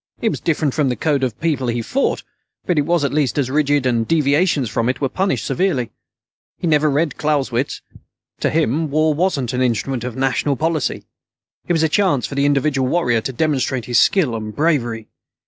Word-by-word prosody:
It 225 - +1
was - - -3
different 155 -4 0
from 145 -4 +1
the 125 - -1
code 145 -2 0
of 125 -4 -1
the - - -35
people 150 -6 0
he 120 0 -1
fought, 275 - -1 0.4
but 175 -5 +1
it 145 - -1
was 170 -3 +2
at 140 - -2
least 145 -4 0
as 130 -3 0
rigid, 145 -1 +1
and 115 -3 +1
deviations 150 -2 +2
from 115 +2 -1
it 130 - -2
were 135 - 0
punished 190 +8 -1
severely. 170 - 0 0.7
He'd 170 - -1
never 150 0 +3
read 150 +2 0
Clausewitz. 140 -4 -1 0.6
To - - +1
him, 155 0 0
war 155 +2 +2
wasn't 145 -7 -1
an 125 - -1
'Instrument 125 +1 -1
of 125 -2 -5
National 135 +2 0
Policy'. 160 +1 -1 0.6
It 175 - +1
was 160 -1 +2
a - - +4
chance 155 - +1
for - - -6
the 140 +1 +1
individual 140 -2 +1
warrior 125 -7 +1
to 135 - -4
demonstrate 130 -3 -1
his 120 -2 +2
skill 155 -12 +3
and 110 -1 -6
bravery. 120 -8 0
140 Hz, 200 wpm, -19 LUFS, 125-155 Hz, 0.7 s, a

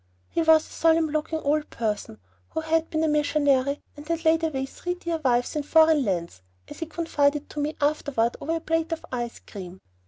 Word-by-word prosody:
He 335 - +1
was 320 -1 +5
a - - -16
solemn 325 -1 +3
looking 310 +1 -1
old 300 +1 0
person, 210 - -3 0.3
who 320 - -3
had 320 +1 +1
been 315 0 0
a - - +3
missionary, 285 -2 +2
and 295 +1 -11
"had 335 0 -2
laid 320 +1 +4
away 270 -5 -1
three 355 +6 -4
dear 340 -2 -3
wives 245 0 +1
in 300 - 0
foreign 315 0 +5
lands," 170 - -2 0.3
as - - -9
he 330 - -3
confided 295 -3 0
to 300 - -5
me 295 +1 -1
afterward 285 -5 +1
over 325 +3 -1
a - - -1
plate 325 0 -1
of 330 - -3
ice 240 -2 -3
cream. 190 -2 -9
300 Hz, 200 wpm, -25 LUFS, 265-320 Hz, 0.3 s, was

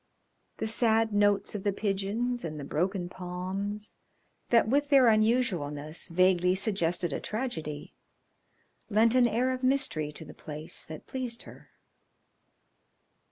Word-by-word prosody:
The - - -2
sad 225 0 +2
notes 205 -1 +2
of 210 - -4
the 205 - +2
pigeons 210 +5 -2
and 155 -2 -5
the - - -6
broken 175 +6 -1
palms, 185 +4 -4 0.6
that 230 -2 +4
with 285 +4 +1
their 275 -3 +6
unusualness 200 - +1
vaguely 180 +1 +3
suggested 180 -5 0
a - - -2
tragedy, 165 - -5 1.0
lent 225 +2 +4
an 250 -1 +5
air 245 +3 +1
of 255 0 -3
mystery 255 - +1
to 160 - -10
the - - -11
place 150 +1 -6
that 155 -1 -9
pleased 250 -3 -5
her. - - -14
205 Hz, 130 wpm, -29 LUFS, 175-235 Hz, 1.0 s, their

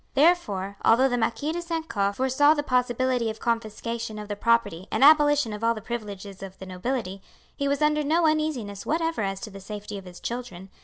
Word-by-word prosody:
Therefore, 215 - +2
although 255 +4 +5
the 245 - 0
Marquis 285 +6 -1
de 345 +2 -3
St. 330 -2 -4
Caux 200 -5 0
foresaw 265 +5 +4
the 290 - -1
possibility 250 -2 +1
of 220 0 -6
confiscation 230 0 -3
of 210 0 -7
the 205 - -2
property 210 -5 +1
and - - +1
abolition 290 -5 +5
of 210 +2 -7
all 230 0 +3
the - - -5
privileges 205 -4 -6
of 190 -1 -8
the 190 - -9
nobility, 195 +1 -3 0.3
he 280 - -1
was 280 +2 +1
under 300 0 +3
no 325 +4 +2
uneasiness 305 -11 0
whatever 325 -3 -1
as 195 -1 -2
to 220 - -7
the 195 - -9
safety 205 +1 -7
of 190 - -14
his 175 -1 -11
children. 235 -6 -6
230 Hz, 205 wpm, -26 LUFS, 200-290 Hz, 0.3 s, although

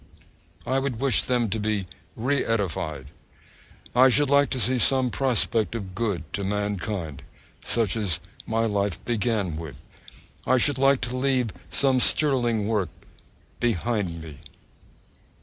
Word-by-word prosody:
I 130 +2 +1
would 135 -4 -3
wish 135 -1 +3
them 120 -2 0
to 110 - -1
be 105 -2 -1 0.3
re 130 +5 0
edified. 85 - -2 0.8
I 130 +2 +7
should 140 +2 +2
like 140 0 +4
to 130 - -2
see 125 +1 +1
some 130 0 +3
prospect 115 -5 +1
of 95 -5 -6
good 100 -5 -2
to 100 - -2
mankind, 100 -6 -3 0.4
such 115 -4 +1
as 100 -8 -1 0.3
my 115 0 +1
life 100 -4 -1
began 110 -7 -1
with. 80 -4 -8 0.7
I 130 - +4
should 130 +2 +2
like 135 0 +4
to 125 +1 -2
leave 130 -3 +1 0.2
some 135 -2 +2
sterling 120 -6 +3
work 105 -6 0 0.7
behind 105 -6 -1
me. 75 -3 -10
115 Hz, 135 wpm, -25 LUFS, 100-130 Hz, 0.8 s, I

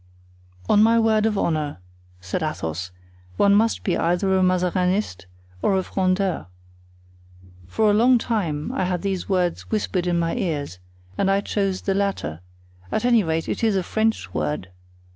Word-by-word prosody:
"On 210 - +5
my 225 +1 +5
word 220 -1 +3
of 210 -2 -1
honor," 155 -5 -1 0.4
said 90 - -4
Athos, 90 - -3 0.5
"one 200 0 +4
must 220 +2 +2
be 180 - 0
either 180 +3 +1
a 190 - +3
Mazarinist 180 - 0 0.3
or 195 - +2
a 190 - 0
Frondeur. 185 - -1 1.2
For 210 - +2
a - - +2
long 245 +4 +5
time 175 -11 -2
I 185 - -1
had 180 0 -2
these 195 -2 -2
words 180 -3 0
whispered 195 -4 -1
in 175 -1 +1
my 165 -1 0
ears, 145 - -3 0.4
and 195 - +2
I 195 +1 +2
chose 195 -2 -1
the 195 - 0
latter; 190 - -2 0.5
at 220 - -1
any 235 -3 +4
rate, 160 -1 -1
it - - -3
is 220 -3 +3
a 190 - +1
French 220 - -1
word. 75 +3 -2
185 Hz, 160 wpm, -23 LUFS, 165-205 Hz, 1.2 s, On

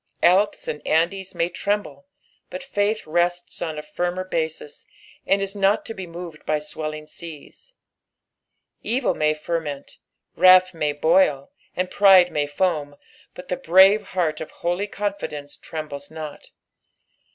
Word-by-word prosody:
^' - - +8
Alps 190 +4 +2
and 150 - -4
Andes 180 +4 0
may 170 - +1
tremble, 205 +9 -3 0.4
but 275 - -7
faith 215 -4 -1
rests 175 +2 -1
on 160 -3 -3
a 150 - -5
firmer 175 +4 -3
basis, 160 -4 -4 0.4
and 195 0 +2
is 195 +1 -4
not 200 +1 +2
to 225 - -5
be 190 -4 -7
moved 170 -2 -9
by 155 - 0
swelling 155 0 -6
aeaa. 170 - -11 1.1
Evil 245 +3 0
may 155 0 +1
ferment, 150 -3 -5 0.4
wrath 185 +1 +6
may 150 -3 -1
boil, 150 -2 +2 0.2
and 180 0 -2
pride 190 -3 +6
may 145 -1 0
foam, 145 -2 -1 0.4
but 180 - -11
the 180 - 0
brave 190 +5 +6 0.2
heart 160 -4 0
of 160 - -6
holy 175 +4 -2
confidence 200 -9 -4
trembles 150 -3 -7
not. 155 -2 -8
175 Hz, 140 wpm, -23 LUFS, 155-190 Hz, 1.1 s, ^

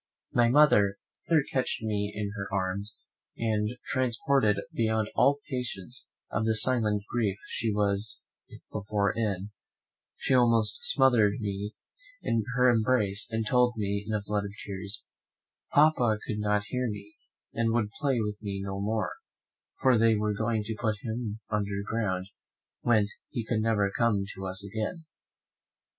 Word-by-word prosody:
My 120 -1 +4
mother 105 -8 +5 0.6
catched 130 -3 0
me 105 -1 -1
in 105 -1 -3
her 95 -2 -4
arms, 100 +2 -2 0.4
and, 110 -2 0 0.2
transported 125 -3 +2 0.2
beyond 110 -1 0
all 140 +1 +4
patience 125 - -5 0.2
of 110 - 0
the 110 0 +2
silent 110 -3 +2
grief 105 -5 0
she 115 -1 -1
was 100 +1 0 0.5
before 100 -1 0
in, 105 -3 -1 0.7
she - - 0
almost 115 -4 +4
smothered 120 -7 +4
me 105 0 -4 0.5
in 115 -1 +1
her 125 0 +5
embrace; 110 -4 +2
and 110 -1 -1
told 125 +1 +3
me 100 -1 -1
in - - -3
a 105 - -2
flood 105 0 -1
of 100 - -7
tears, 100 +1 -5 0.7
"Papa 140 -7 +4
could 105 - -3
not 105 0 +1
hear 125 -1 -1
me, 105 0 -7 0.4
and 115 -1 +1
would 110 -3 0
play 140 -5 +1
with 105 -1 -3
me 100 -2 -3
no 95 0 -4
more, 110 +2 -1 0.7
for 130 -3 +5
they 115 0 +5
were 105 0 0
going 110 +1 0
to 110 +1 -4
put 110 -3 +1
him 110 -1 -4
under 100 -1 -1
ground, 100 -5 -1 0.6
whence 110 -3 +2 0.2
he 115 -3 -3
could 110 -1 0
never 105 -3 +2
come 115 -4 +2
to 95 0 -6
us 95 +2 -3
again." 110 - -4
110 Hz, 150 wpm, -29 LUFS, 100-115 Hz, 0.7 s, mother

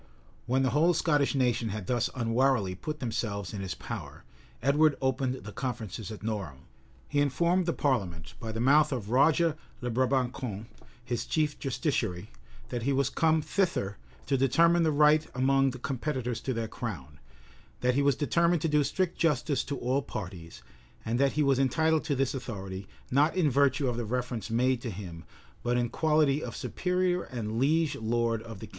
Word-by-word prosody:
[] - - -31
When 130 +2 +2
the 130 - +1
whole 165 +4 +3
Scottish 145 -4 +2
nation 120 -3 +1
had 105 -1 -5
thus 120 0 0
unwarily 120 -4 +1
put 150 - -5
themselves 105 -5 -3
in 100 - -4
his 95 -4 -4
power, - - -7 0.4
Edward 145 +3 +3
opened 130 -1 0
the 105 - -8
conferences 110 -5 -5
at 105 - -9
Norham: 100 -11 -4 0.5
he 145 - 0
informed 170 +6 +2
the 170 - +1
parliament, 95 - -1
by 115 - -5
the 110 - -4
mouth 150 +5 +4
of 115 -5 -3
Roger 155 +5 +4 0.2
le 125 -1 -3
Brabançon, 125 -3 -1 0.4
his 120 -1 -3
chief 150 -2 0
justiciary, 115 - -2 0.4
that 120 - -3
he 135 +5 0
was 135 -1 +1
come 160 -2 +2
thither 155 - -1 0.3
to 135 - +1
determine 165 +7 +4
the 160 -2 +3
right 150 +1 +4
among 135 +1 +3
the 130 - -6
competitors 130 -2 -3
to 130 - -2
their 115 -1 -2
crown; 75 - -7 0.6
that 125 0 +2
he 140 - +2
was 140 -2 +3
determined 170 +3 +2
to - - +2
do 150 -1 +3
strict 180 +4 -1
justice 150 -3 +1
to 140 - -3
all 130 +3 0
parties; 90 -9 -8 0.4
and 115 +2 0
that 140 0 +3
he 150 - +2
was 135 -2 +3
entitled 160 +4 +2
to 145 - 0
this 135 -1 0
authority, 100 -7 -6 0.2
not 145 +6 +3
in 165 -6 +2
virtue 140 +1 +3
of 120 -2 -1
the 120 - -2
reference 120 -1 -3
made 125 +2 +1
to 120 - -4
him, 90 -5 -8 0.4
but 120 0 0
in 120 -1 0
quality 150 +1 +2
of - - -6
superior 180 0 0
and 115 -3 -4
liege 155 +3 +2
lord 115 0 0
of 110 -3 -10
the - - -5
kingdom. - - -16
130 Hz, 185 wpm, -29 LUFS, 115-150 Hz, 0.6 s, mouth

